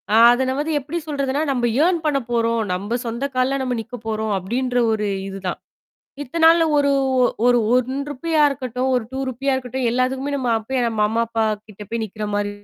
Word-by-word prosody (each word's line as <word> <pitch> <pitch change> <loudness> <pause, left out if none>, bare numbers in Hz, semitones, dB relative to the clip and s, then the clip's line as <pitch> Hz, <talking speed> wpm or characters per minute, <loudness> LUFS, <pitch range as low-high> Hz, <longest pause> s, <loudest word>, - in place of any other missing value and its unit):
அ - - +7
அத 245 +2 +3
நான் 260 - -1
வந்து 310 +2 -1
எப்டி 290 +5 -5
சொல்றதுன்னா, 280 0 -1
நம்ம 250 -2 -1 0.2
ஏர்ன் 360 -1 +3
பண்ண 295 -2 +2
போறோம். 230 -1 +1
நம்ப 200 +5 -3
சொந்த 235 +4 -3
கால்ல 260 +2 +1
நம்ம 255 -1 -1
நிக்க 230 +3 -9
போறோம் 220 -1 -2
அப்டின்ற 245 +7 -2
ஒரு 210 -1 0 0.2
இதுதான். 190 -2 -5 0.6
இத்த 290 +3 -9
நாள்ல 330 +1 +7
ஒரு 285 -1 +3 0.6
ஒ - - +6 0.3
1 255 +2 +1
ருப்பியா 315 +3 -1
இருக்கட்டும், 255 -2 -3
ஒரு 245 - +1
2 265 - -5
ரூப்பியா 270 +2 -1
இருக்கட்டும் 260 -1 -2
எல்லாத்துக்குமே 260 +3 -1
நம்ம 260 -3 -2
அப்பயா 255 +4 -2
நம்ம 220 -2 -1
அம்மா 225 +2 0
அப்பா 225 -1 0 0.2
கிட்ட 210 -1 -11
போய் 230 0 -2
நிக்கிற 215 0 -6
மாரி 205 0 0
250 Hz, 190 wpm, -21 LUFS, 225-270 Hz, 0.6 s, அ